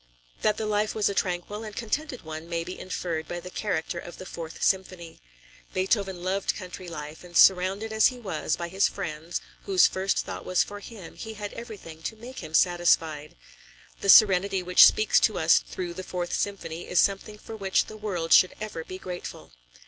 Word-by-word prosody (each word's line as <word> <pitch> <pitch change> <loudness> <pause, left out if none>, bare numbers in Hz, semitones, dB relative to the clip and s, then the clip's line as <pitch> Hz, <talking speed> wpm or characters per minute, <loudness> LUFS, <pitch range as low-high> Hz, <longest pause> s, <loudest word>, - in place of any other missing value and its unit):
That 215 0 +2
the 220 - -2
life 210 0 0
was 215 -2 +2
a - - -2
tranquil 190 +3 -2
and 215 -2 -8
contented 255 +4 -3
one 160 +1 -7
may 170 -1 -2
be 180 +2 -8
inferred 170 -3 -4
by 175 - -4
the 180 +1 -10
character 180 -5 -2
of 175 - -10
the 185 - -9
Fourth 165 -3 -7
Symphony. 185 -3 -1 0.6
Beethoven 190 -1 0
loved 190 +1 -1
country 185 -1 -8
life, 150 -1 -8
and 175 -1 -4
surrounded 195 +4 +4
as 220 0 +5
he 255 - -4
was 190 -9 -2
by 170 - -5
his 190 +3 +2
friends, 165 -3 -5 0.3
whose 190 -2 +5
first 190 +1 0
thought - - -6
was 185 - +2
for 205 0 -9
him, 205 -4 -11
he 220 -1 -7
had 205 -1 -6
everything 200 -9 -9
to 220 - -4
make 245 +4 -10
him 155 - -6
satisfied. 165 -4 +2 0.6
The 200 - -2
serenity 195 -2 +6
which 180 0 +8
speaks 215 - +3
to 215 - +2
us 160 0 +5
through 175 -2 -6
the 185 - -6
Fourth 180 -1 -4
Symphony 175 -4 -3
is 180 - +2
something 200 +2 +1
for 220 - -9
which 195 -3 +1
the 215 - -10
world 185 -6 -1
should 185 - +6
ever 215 -6 -5
be 185 - -8
grateful. 180 - -8
185 Hz, 195 wpm, -26 LUFS, 170-210 Hz, 0.6 s, which